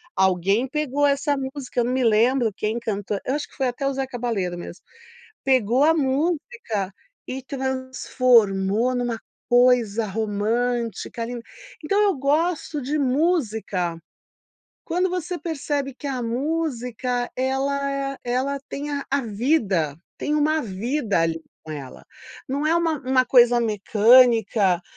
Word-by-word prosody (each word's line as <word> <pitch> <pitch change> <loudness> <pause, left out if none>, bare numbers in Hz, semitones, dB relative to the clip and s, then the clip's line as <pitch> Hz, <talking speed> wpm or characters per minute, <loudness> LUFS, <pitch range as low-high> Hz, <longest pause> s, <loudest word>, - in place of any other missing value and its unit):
Alguém 190 +6 +2
pegou 290 0 0
essa 285 +1 +1
música, 265 -1 -4
eu - - 0
não 250 - -1
me 260 -1 +1
lembro 230 +2 +3
quem 215 +3 -2
cantou 205 -2 -3
eu 265 - 0
acho 295 - -3
que - - -20
foi 265 -2 0
até 275 +3 -3
o 275 - 0
Zeca 265 -2 -4
Balero 195 -7 -2
mesmo. 175 +1 -9 0.6
Pegou 255 -1 +3
a 320 +2 +5
música 285 - -1 0.3
e 260 0 -5
transformou 255 -5 +1
numa 240 -2 -2 0.3
coisa 245 -3 +4
romântica 225 +3 -2
ali. 240 +1 -5 0.4
Então 395 +7 0
eu 405 -3 +3
gosto 305 +2 0
de 295 +4 -1
música, 240 - 0 0.9
quando 360 +2 +1
você 360 0 -3
percebe 290 -3 -3
que 285 - -7
a 260 -2 -2
música 250 -2 -2
ela 275 +2 0
é 275 0 -3
ela 260 +3 -1
tem 290 +1 -5
a 280 -1 -3
a 280 0 +2
vida, 210 - 0 0.2
tem 300 - -2
uma 305 +1 +2
vida 220 - -1
ali 165 0 0 0.2
com 155 - -8
ela. 135 - -8 0.5
Não 280 +3 -1
é 325 - +3
uma 330 -3 +1
uma 255 0 +3
coisa 245 -2 +5
mecânica, 220 -3 +4
255 Hz, 140 wpm, -23 LUFS, 220-280 Hz, 0.9 s, a